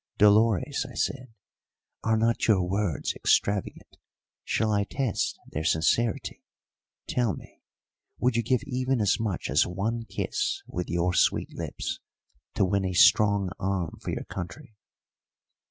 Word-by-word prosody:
"Dolores," 105 -2 +4
I - - -12
said, 130 -3 -2 0.7
"are 110 0 +2
not 115 +1 +1
your 100 -5 +4
words 95 -6 -1
extravagant? 100 -1 0 0.5
Shall 110 -1 0
I 100 -1 +2
test 125 +1 -2
their 80 - -5
sincerity? 90 +8 0 0.6
Tell 120 -5 0
me, - - -14 0.6
would 125 -1 +1
you 115 - +3
give 125 +3 0
even 130 -1 -1
as 100 -3 +2
much 105 -5 -2
as 75 +3 +3
one 110 +6 -2
kiss - - -2
with 90 0 -5
your 85 +1 +1
sweet - - +2
lips - - -4 0.6
to - - +3
win 100 +1 +1
a 95 -1 -2
strong 100 +2 +5
arm 95 -4 -2
for - - -5
your - - -3
country?" 90 +4 -8
100 Hz, 140 wpm, -27 LUFS, 90-115 Hz, 0.7 s, strong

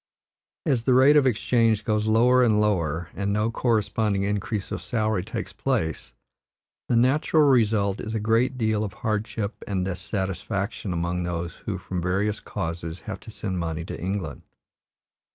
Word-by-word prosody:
As 120 -4 +1
the 130 - +4
rate 135 +3 +7
of 145 -3 +5
exchange 115 -2 +2
goes 110 -1 +1
lower 125 +3 +5
and 110 -3 +3
lower, 85 -6 0
and 100 0 -2
no 105 +2 +1
corresponding 110 -4 +1
increase 105 0 -2
of - - -3
salary 110 -5 0
takes 110 - -5
place, 105 - -2 0.8
the 120 - +3
natural 140 +6 +3
result 110 -7 +3
is 110 +1 -4
a - - 0
great 115 +4 +2
deal 110 -2 +1
of 100 -4 -4
hardship 105 +1 -3
and 95 -3 -1
dissatisfaction 95 +1 -3
among 85 +1 -1
those 85 -1 -3
who, 100 -3 -1
from 90 0 -4
various 100 +4 0
causes, 85 -2 -5
have - - -6
to - - -13
send 95 -2 -4
money 80 -1 -3
to - - -7
England. 95 -5 -3
105 Hz, 155 wpm, -25 LUFS, 90-115 Hz, 0.8 s, rate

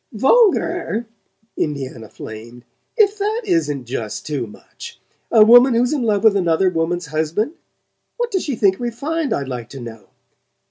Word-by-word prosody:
"VULGAR?" 340 - +2 0.5
Indiana 130 -7 -4
flamed. 115 +3 -10 0.3
"If 420 -1 +3
that 430 +3 -1
isn't 150 - 0
just 115 -3 -5
too 140 -6 -3
much! 105 - -12 0.3
A 220 -2 +7
woman 245 +2 +7
who's 245 +4 +2
in 290 - -1
love 210 -4 0
with 220 -2 +5
another 180 0 +2
woman's 170 +1 -1
husband? 160 - -2 0.6
What 480 0 -2
does 380 -3 -1
she 280 - -2
think 195 -3 +2
refined, 280 +6 -3
I'd 140 - -1
like 125 -3 -6
to 135 - -9
know? 115 -4 -10
200 Hz, 150 wpm, -19 LUFS, -, 0.6 s, A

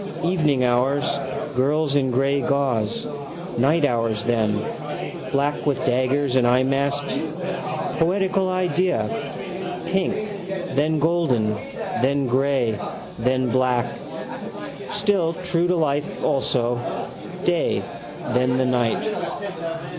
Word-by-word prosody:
Evening 155 -7 +2
hours, 130 +4 +2 0.5
girls 145 +3 +2
in 135 -2 +3
grey 135 +3 +2
gauze. 135 -8 0 0.5
Night 150 +5 +4
hours 115 -4 +1
then: 110 -3 +2 0.7
black 140 +1 +1
with 145 - +3
daggers 130 +2 +2
and 125 -2 +4
eyemasks. 135 +3 +2 0.8
Poetical 190 +2 +2
idea: 185 0 +1 0.8
pink, 190 -1 +1 0.6
then 155 +3 +2
golden, 145 -9 +2 0.5
then 140 +2 +2
grey, 130 -4 +2 0.4
then 130 +1 +1
black. 125 -1 +3 1.0
Still, 200 -5 +2
true 175 -1 +2
to 180 - +2
life 145 -3 0
also. 125 -4 +1 0.7
Day: - - +2 0.5
then 125 0 +3
the 130 - +2
night. 125 - +1
140 Hz, 95 wpm, -23 LUFS, 125-160 Hz, 1.0 s, Night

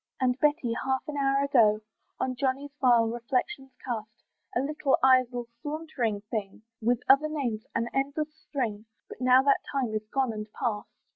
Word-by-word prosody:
And 255 -2 +2
Betty, 295 -6 +2
half 265 -1 0
an 300 - -4
hour 275 0 +2
ago, 225 -7 +4 0.4
On 255 -1 -1
Johnny 275 +2 -1
vile 240 -3 +5
reflections 250 +3 -2
cast; 220 -3 -5 0.3
"A - - +3
little 280 0 +1
idle 255 -2 +4 0.2
sauntering 290 -9 -2
thing!" 210 -1 -5 0.2
With 240 +2 +1
other 280 +3 +5
names, 245 -8 -3
an 230 +1 0
endless 285 +3 -1
string, 230 -9 -4 0.2
But - - -11
now 255 +1 +6
that 280 0 +3
time 260 -6 -1
is 215 0 -3
gone 260 0 0
and 215 0 -7
past. 220 -5 -2
255 Hz, 160 wpm, -28 LUFS, 230-275 Hz, 0.4 s, now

